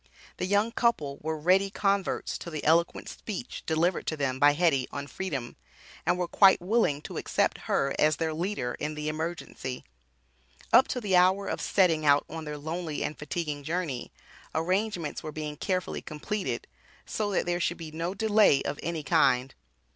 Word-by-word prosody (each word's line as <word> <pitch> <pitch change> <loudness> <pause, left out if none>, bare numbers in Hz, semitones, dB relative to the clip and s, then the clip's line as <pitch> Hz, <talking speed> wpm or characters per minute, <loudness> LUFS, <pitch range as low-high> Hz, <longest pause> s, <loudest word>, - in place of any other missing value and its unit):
The 180 - -2
young 205 +3 +2
couple 155 - 0
were 160 +1 -2
ready 185 +5 +3
converts 195 -1 0
to - - -7
the 155 -3 -5
eloquent 170 +2 +2
speech 220 +3 -6
delivered 165 +3 +1
to 155 - -1
them 130 -2 -1
by 145 +1 +6
Hetty 145 -5 +2
on 140 0 -4
Freedom, 140 -7 -4 0.5
and - - +3
were 180 -1 -1
quite 190 +2 +6
willing 180 -7 +1
to - - -7
accept - - 0
her 135 0 +2
as 155 0 +4
their 160 -1 -1
leader 165 -7 -2
in 155 0 -3
the 150 0 -3
emergency. 155 -5 -5 0.9
Up 260 - +8
to 250 - -3
the 200 -4 +1
hour 185 +2 +4
of - - -3
setting 170 -5 +3
out 145 -1 +4
on 160 0 -7
their 150 0 -5
lonely 160 +1 -3
and 150 - -4
fatiguing 150 -1 -3
journey, 155 -5 -3 0.4
arrangements 180 0 -1
were 155 - -6
being 150 -1 -5
carefully 185 +4 -2
completed, 190 +7 -4 0.4
so 210 -1 -2
that 195 - 0
there 175 0 0
should 175 0 0
be 160 -2 -8
no 165 +4 -3
delay 210 -7 +4
of 140 - -3
any 165 -2 -3
kind. 125 -2 +3
165 Hz, 175 wpm, -28 LUFS, 150-185 Hz, 0.9 s, Up